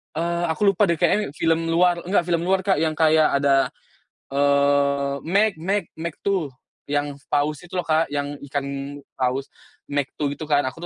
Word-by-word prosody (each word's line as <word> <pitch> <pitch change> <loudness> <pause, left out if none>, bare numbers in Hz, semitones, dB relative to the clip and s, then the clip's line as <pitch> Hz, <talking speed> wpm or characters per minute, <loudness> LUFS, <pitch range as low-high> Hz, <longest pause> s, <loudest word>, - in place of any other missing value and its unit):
eee, 170 +1 -1
aku 195 +5 +2
lupa 205 0 +2
deh 170 - +2
kayaknya 175 -1 +1
film 165 +1 +1
luar 175 +1 +3
enggak 190 -1 +2
film 170 -1 0
luar 190 0 +2
Kak, 190 -4 +2
yang 160 -1 0
kayak 155 -2 +4
ada 135 -1 +4 0.6
eee, 140 0 +2
Meg 200 +6 +3
Meg 195 +4 0
Meg 165 0 -4
2, 180 -9 -1 0.3
yang 145 0 -2
paus 145 +1 0
itu 175 - -10
loh 180 - 0
Kak, 160 0 +2
yang 145 0 -4
ikan 140 0 -2 0.6
paus 130 +2 -1 0.4
Meg 145 -1 0
2 145 -2 -1
gitu 155 - -6
kan 145 -1 +3
aku 130 +4 -5
155 Hz, 175 wpm, -23 LUFS, 140-175 Hz, 0.6 s, kayak